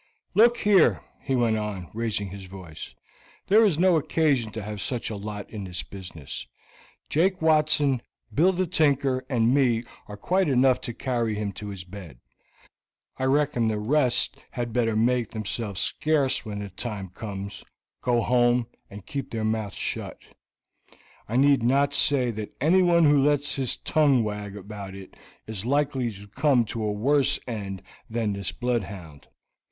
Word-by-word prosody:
"Look 235 +2 +5
here," 205 -6 +4 0.2
he 135 - -1
went 115 -3 +2
on, 105 -5 -5
raising 110 -3 -2
his 95 0 -9
voice. 90 -5 -10 0.5
"There 215 +3 +5
is 195 -8 +3
no 180 0 +4
occasion 140 -7 +1
to 110 - -5
have 105 -1 -5
such 115 +3 -2
a - - -4
lot 105 0 -6
in 105 -3 -6
this 90 -1 -4
business; 80 -10 -8 0.6
Jake 185 +4 +1
Watson, 150 -4 +3 0.3
Bill 175 +6 +4
the 185 0 0
Tinker, 140 -6 +1
and 120 -2 +2
me 125 -5 +2 0.2
are 105 - -8
quite 185 - +1
enough 130 -1 +3
to 120 - -5
carry 120 -4 -1
him 105 -1 -2
to 105 +3 -8
his 100 -3 -6
bed. 90 -7 -11 1.0
I 130 - -1
reckon 135 -4 +2
the 110 -1 0
rest 125 +3 +2
had 120 -2 -4
better 115 -2 +1
make 120 +1 +2
themselves 105 -2 -4
scarce 150 -4 +1
when 105 -2 -6
the 100 -1 -5
times 95 -1 -6
comes, 100 -1 -6 0.4
go 120 -2 +1
home, 120 0 +3 0.2
and 100 -1 -11
keep 140 -2 -5
their 110 -1 -3
mouths 110 -2 -2
shut. - - -3 1.1
I 115 - -2
need 140 0 +4
not 140 +4 +2
say 130 -4 +3
that 110 -1 -7
anyone 170 +3 +4
who 145 -1 +5
lets 145 +1 +2
his 130 -3 0
tongue 140 -6 +3
wag 105 -1 -5
about 100 -1 -8
it 95 -1 -11 0.3
is 110 -3 -5
likely 135 -2 0
to 100 +1 -12
come 130 +2 +2
to 115 - -3
a 105 - 0
worse 135 +6 +2
end 100 -5 -5 0.3
than 110 -2 -1
this 100 -1 -3
bloodhound. 100 - -4
120 Hz, 160 wpm, -26 LUFS, 105-140 Hz, 1.1 s, Look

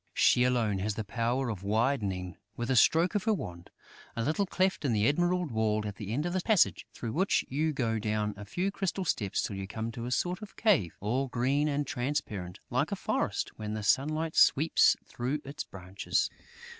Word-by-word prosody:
She 125 - +5
alone 115 -6 +1
has 100 +1 -1
the 110 - -3
power 120 +5 -1
of 105 -5 -4
widening, 100 -4 0 0.2
with 120 +2 -2
a - - +3
stroke 165 - +4
of 205 -3 -1
her 220 - +3
wand, 85 - -7 0.5
a 115 - -1
little 160 - 0
cleft 185 -1 0
in 125 -6 +1
an - - +1
emerald 175 +8 +2
wall 110 -1 +1
at 100 -1 -5
the 105 -2 -6
end 145 +7 -1
of 175 - -2
the 185 - 0
passage, 210 -1 +2
through 115 - -5
which 190 +5 +2
you 155 +4 0
go 115 -6 -1
down 105 -1 -1
a 105 - -8
few 180 - -2
crystal 195 -1 -2
steps 100 - 0
till 100 - -3
you 95 0 -5
come 110 +2 -4
to 120 0 -6
a - - -4
sort 180 +8 0
of 210 - -10
cave, 175 - +2
all 125 +7 0
green 130 +4 +1
and 145 0 0
transparent 110 -10 -3
like - - +1
a - - 0
forest - - -1
when 105 0 -3
the 110 - -4
sunlight 155 +8 +1
sweeps 155 +4 +5
through 130 +5 -3
its 140 +2 -5
branches. 95 +1 -2
125 Hz, 205 wpm, -30 LUFS, 105-155 Hz, 0.5 s, She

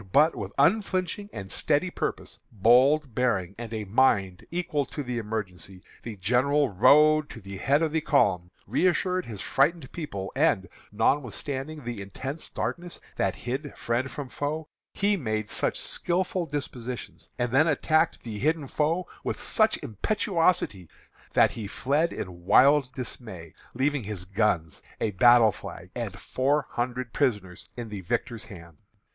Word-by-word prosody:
"But 150 - +5
with 100 -1 -5
unflinching 190 +4 +1
and 95 -1 -7
steady 155 +4 +1
purpose, - - -4
bold 125 +6 +4
bearing, 100 -7 0
and 120 -2 -6
a 110 -2 -3
mind 95 -4 +2
equal 170 -4 -1
to 145 - -5
the 125 -2 -3
emergency, 95 -4 -5 0.2
the 115 -3 -7
general 130 +9 +2
rode 150 +9 +5
to - - -9
the 100 -1 -8
head 140 - +2
of 160 - 0
the 160 0 0
column, 95 - +2 0.2
reassured 185 - +1
his 105 -4 -6
frightened 145 0 +1
people, 100 - -5
and, 125 -10 +2 0.2
notwithstanding 140 +5 -1
the 120 -4 -4
intense 130 - -6
darkness 175 0 -4 0.2
that 95 -1 +1
hid 135 +4 -5
friend 120 +3 -1
from 145 0 -6
foe, 150 +4 -4 0.3
made 110 - 0
such - - 0
skilful 180 0 -1
dispositions, 125 -4 -6
and 120 -1 -1
then 140 +6 +4
attacked 155 +2 +2
the 110 -3 -6
hidden 155 +3 +1
foe 160 +6 0 0.2
with - - -3
such - - +2
impetuosity 165 - 0 0.4
that - - +5
he 110 -3 -6
fled 145 +9 0
in 90 -2 -7
wild 135 +4 +5
dismay, 110 - -7 0.2
leaving 135 -1 0
his 100 -3 -5
guns, 95 -5 0 0.2
a 110 - 0
battle 120 +2 +6
flag, 90 0 -10
and 110 -6 -4
four 140 +7 0
hundred 125 0 -3
prisoners 105 -10 -1
in 120 -2 -5
the 105 -2 -6
victor's 110 +5 -3
hands. 85 -5 -13
125 Hz, 145 wpm, -27 LUFS, 105-150 Hz, 0.4 s, battle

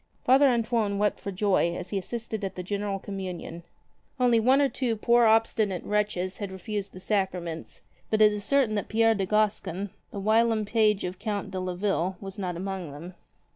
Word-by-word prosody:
Father 270 +3 +6
Antoine 230 -4 +1
wept 210 0 +1
for 200 - -5
joy 185 -3 +1
as 180 - -7
he 200 - -1
assisted 220 +1 -5
at 195 - -3
the 180 - -5
general 200 +1 -2
Communion. 185 -4 -6 0.6
Only 245 -2 +4
one 255 +5 +4
or 285 - +4
two 245 -2 -1
poor 235 +2 +4
obstinate 220 -4 +2
wretches 205 -3 -1
had 200 -2 -5
refused 195 +2 -5
the 185 - -9
sacraments; 185 -4 -3 0.3
but 215 - +1
it 210 -1 +6
is 205 -1 -4
certain 270 -4 +2
that 205 - -2
Pierre 225 +1 +4
de 195 -3 -2
Gascon, 205 -2 0 0.2
the 200 - -6
whilom 220 +1 +2
page 215 -1 +2
of 180 0 -5
the - - -19
Count 205 -3 -3
de 190 - -3
Leville, 185 0 -1
was 195 +1 -8
not 180 -3 -3
among 190 -3 -4
them. 165 +6 -9
205 Hz, 190 wpm, -27 LUFS, 185-220 Hz, 0.6 s, Father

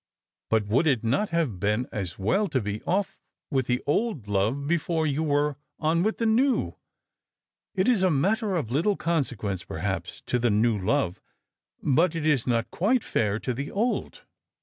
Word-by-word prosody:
But 110 -2 +2
would 120 +11 +2
it 130 -7 +2
not 140 - +1
have 160 - -1
been 105 +5 +1
as 95 -5 -4
well 190 - +1
to 135 - 0
be 105 -1 -4
off 195 +2 0 0.3
with 130 -3 +1
the 125 0 0
old 150 - 0
love 105 +8 0
before 165 0 0
you 145 0 0
were 145 -2 +1 0.2
on 165 +2 +1
with 215 +4 0
the 230 - -1
new? 245 +4 +2 1.0
It 190 +1 +1
is 240 -6 +3
a 190 - +4
matter 195 +7 +1
of 140 -10 -2
little 170 +10 +1
consequence, 120 - -1
i:)erhap8, - - -4
to 125 - 0
the 120 0 +2
new 110 +1 +2
love; 90 -1 0 0.6
but 160 +5 +3
it 160 -2 -2
is 140 -6 +2
not 115 -2 0
quite 230 +8 +1
fair 105 -2 0
to 125 - -2
the 140 +4 -4
old." 230 +5 -2
145 Hz, 175 wpm, -26 LUFS, 115-180 Hz, 1.0 s, a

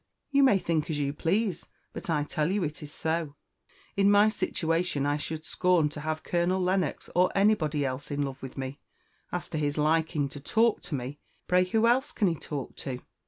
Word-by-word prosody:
"You 280 0 +4
may 260 -7 +6
think 165 -4 -1
as 155 - -1
you 140 -1 -1
please, 185 +4 0 0.3
but - - -7
I 150 -3 +2
tell 150 +1 -1
you 200 -1 +1
it 155 0 -4
is 150 -1 -8
so. 160 -2 -2 0.6
In 200 0 +4
my 205 +1 +6
situation 165 -7 0
I 145 +1 +1
should 155 +1 -5
scorn 175 -1 +2
to 150 - -7
have 155 +1 -3
Colonel 175 +2 +1
Lennox, 185 -3 0
or 180 +1 +4
anybody 175 -8 +2
else, 130 +2 -4
in 145 -1 -1
love 135 0 -5
with 135 0 -8
me. 135 +2 -5 0.5
As 180 - -3
to 155 - -2
his 145 0 -1
liking 155 -1 +2
to 145 - -8
talk 220 +10 +2
to 150 - -1
me, 135 +3 -5 0.3
pray 180 0 +4
who 220 +4 +2
else 260 +5 +2
can 210 - +2
he 170 - +2
talk 145 -3 -6
to? 130 -2 -4
160 Hz, 205 wpm, -28 LUFS, 145-185 Hz, 0.6 s, may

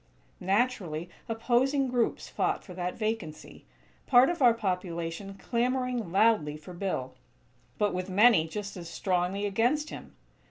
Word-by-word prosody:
Naturally, 185 -5 -1 0.2
opposing 260 +4 +1
groups 245 -2 0
fought - - -1
for 185 - -10
that 180 0 -3
vacancy; 215 -8 -4 0.4
part 250 0 +6
of 345 - -5
our 240 -3 +6
population 180 -2 -3
clamoring 245 -2 -1
loudly 190 -7 +3
for 155 +4 -11
Bill, 170 -9 -3 0.6
but 210 -1 +1
with 185 +1 -3
many 200 -4 +5
just 205 +4 -6
as 170 -2 -8
strongly 185 +3 -1
against 245 +10 +1
him. - - -10
200 Hz, 130 wpm, -29 LUFS, 180-240 Hz, 0.6 s, part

